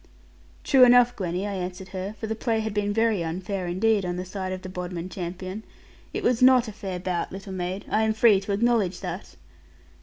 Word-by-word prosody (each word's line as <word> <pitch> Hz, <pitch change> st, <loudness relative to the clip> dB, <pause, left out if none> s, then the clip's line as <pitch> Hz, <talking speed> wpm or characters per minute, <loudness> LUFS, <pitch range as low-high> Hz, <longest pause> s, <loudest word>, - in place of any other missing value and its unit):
'True 265 Hz, -2 st, +6 dB
enough, 245 Hz, 0 st, +6 dB
Gwenny,' 180 Hz, 0 st, -2 dB
I 205 Hz, -, -3 dB
answered 185 Hz, 0 st, -5 dB
her; 190 Hz, +3 st, -5 dB
for -, -, -4 dB
the 220 Hz, -, -2 dB
play 225 Hz, 0 st, -1 dB
had 220 Hz, -1 st, -3 dB
been 205 Hz, 0 st, 0 dB
very 225 Hz, -4 st, +1 dB
unfair 180 Hz, +3 st, -3 dB
indeed 200 Hz, +4 st, +2 dB
on 175 Hz, -1 st, -2 dB
the 180 Hz, +1 st, -4 dB
side 185 Hz, 0 st, -5 dB
of 185 Hz, 0 st, -5 dB
the -, -, -6 dB
Bodmin 180 Hz, -1 st, -5 dB
champion; 185 Hz, +3 st, -5 dB, 0.5 s
'it -, -, -4 dB
was 245 Hz, -1 st, +2 dB
not 255 Hz, -2 st, +6 dB
a -, -, -5 dB
fair 195 Hz, -3 st, -5 dB
bout, 180 Hz, -1 st, -2 dB
little 195 Hz, +1 st, -7 dB
maid; 185 Hz, +1 st, -4 dB
I 215 Hz, -, +1 dB
am 220 Hz, 0 st, +1 dB
free 220 Hz, -3 st, +5 dB
to 195 Hz, +1 st, -5 dB
acknowledge 205 Hz, -4 st, +1 dB
that.' 180 Hz, 0 st, -6 dB
195 Hz, 210 wpm, -25 LUFS, 185-220 Hz, 0.5 s, True